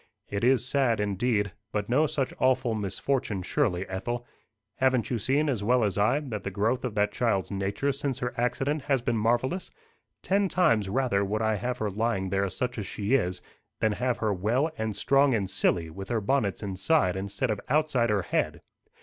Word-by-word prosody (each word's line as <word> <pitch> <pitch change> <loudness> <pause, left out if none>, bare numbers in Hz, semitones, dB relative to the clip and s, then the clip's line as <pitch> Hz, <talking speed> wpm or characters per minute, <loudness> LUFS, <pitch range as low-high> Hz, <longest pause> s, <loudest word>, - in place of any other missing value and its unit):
"It 100 +2 -3
is 125 -1 +3
sad, 125 -5 +2
indeed; 105 0 0 0.2
but 105 -1 -2
no 145 +6 +3
such 140 -4 -2
awful 130 -2 +2
misfortune 105 0 -1
surely, 95 -8 0
Ethel. 120 +6 -4 0.5
Haven't 130 -3 +2
you 120 - 0
seen, 140 +7 +1
as 120 -8 -1
well 120 +2 +3
as 100 -3 0
I, 105 +8 +3
that 115 -8 -5
the - - -2
growth 110 +6 0
of 125 -4 -3
that 105 0 +2
child's 105 -5 0
nature 100 +8 -1
since 135 -1 -2
her 125 -1 -3
accident 135 +5 0
has 135 -4 +1
been 120 -1 0
marvellous? 120 - 0 0.5
Ten 195 0 +2
times 115 - +2
rather 120 -3 +1
would 105 +3 -1
I 110 0 +2
have 125 +4 -2
her 105 -3 -2
lying 105 -2 -1
there 100 +1 0
such 125 +5 -3
as 100 - -4
she 105 +4 -2
is, 90 -8 +1 0.4
than 110 - +2
have 125 +3 -1
her 110 -2 0
well 120 - +1
and 110 -5 -3
strong 135 +1 +3
and 100 -3 -1
silly, 85 -3 0
with 95 +3 -8
her 115 - +1
bonnets 105 -2 0
inside 95 - +1
instead 100 +5 -2
of 105 - -3
outside 140 -5 +2
her 105 -3 +1
head." - - -1
115 Hz, 190 wpm, -27 LUFS, 100-130 Hz, 0.5 s, is